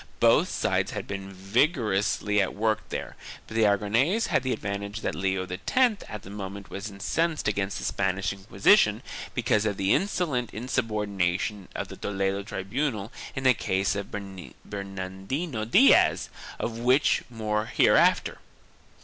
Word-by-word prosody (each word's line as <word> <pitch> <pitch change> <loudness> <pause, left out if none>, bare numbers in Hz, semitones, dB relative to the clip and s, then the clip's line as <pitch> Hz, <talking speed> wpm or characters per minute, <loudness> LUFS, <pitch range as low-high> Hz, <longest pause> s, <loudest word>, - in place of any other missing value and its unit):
Both - - +4
sides - - 0
had - - -4
been 95 -1 -6
vigorously 105 - +1
at 95 - -2
work 110 0 0
there, - - -5 0.3
but - - -11
the 115 -1 +4
Aragonese 115 - +2
had - - +2
the 130 - -2
advantage 100 -1 -4
that - - -2
Leo 95 -1 -1
X 210 - +1
at 105 - -7
the 95 - -10
moment 100 -1 -7
was 100 +2 -5
incensed 155 +11 -1
against 100 -1 -1
the - - -6
Spanish 95 -1 0
Inquisition 100 0 +3 0.3
because 105 - +2
of 100 -2 -2
the 95 +1 +2
insolent 170 - -1
insubordination 105 -5 -1
of - - -4
the - - -9
Toledo 100 0 -1
tribunal 105 +3 -3 0.2
in 135 - -3
the 130 -1 +6
case 95 -3 0
of 100 -1 -4
Bernardino 100 - -5
Diaz, 210 - +5 0.3
of 115 0 -3
which 130 +5 +3
more 110 -2 -2
hereafter. - - +3
105 Hz, 140 wpm, -27 LUFS, 95-120 Hz, 0.3 s, the